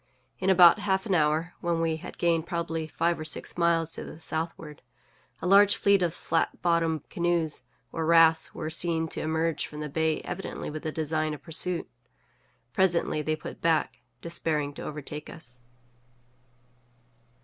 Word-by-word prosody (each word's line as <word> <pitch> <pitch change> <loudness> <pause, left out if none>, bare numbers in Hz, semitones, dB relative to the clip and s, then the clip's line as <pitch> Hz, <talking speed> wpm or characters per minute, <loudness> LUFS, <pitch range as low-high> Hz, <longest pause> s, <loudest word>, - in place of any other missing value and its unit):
In 190 - 0
about 180 +1 +7
half 190 -2 0
an 200 - 0
hour, 160 +1 +1
when 170 -1 0
we 165 -1 0
had - - -10
gained 170 -1 +1
probably 165 -2 -3
five 170 +1 0
or - - -4
six 155 - 0
miles 170 -1 +2
to - - -5
the 160 - -10
southward, 160 -2 -4 0.6
a - - -2
large 200 +2 +6
fleet 200 -1 +3
of 175 - +2
the 165 - -12
flat 165 - -1
bottomed 165 -3 +1
canoes 170 -6 0 0.3
or 160 -1 -2
rafts 165 -1 +5
were 155 0 -4
seen 165 0 0
to - - -3
emerge 160 +1 -1
from 150 - -9
the 150 0 -4
bay 160 +1 0
evidently 180 -3 -5
with 155 0 -6
the 155 - -3
design 155 0 -1
of - - -15
pursuit. 175 +1 0 0.9
Presently 175 -4 +2
they 155 +1 -1
put 155 - -9
back, 160 -6 +1 0.2
despairing 155 -3 -2
to - - -9
overtake 150 0 -6
us. 125 -6 -5
165 Hz, 165 wpm, -27 LUFS, 155-170 Hz, 0.9 s, about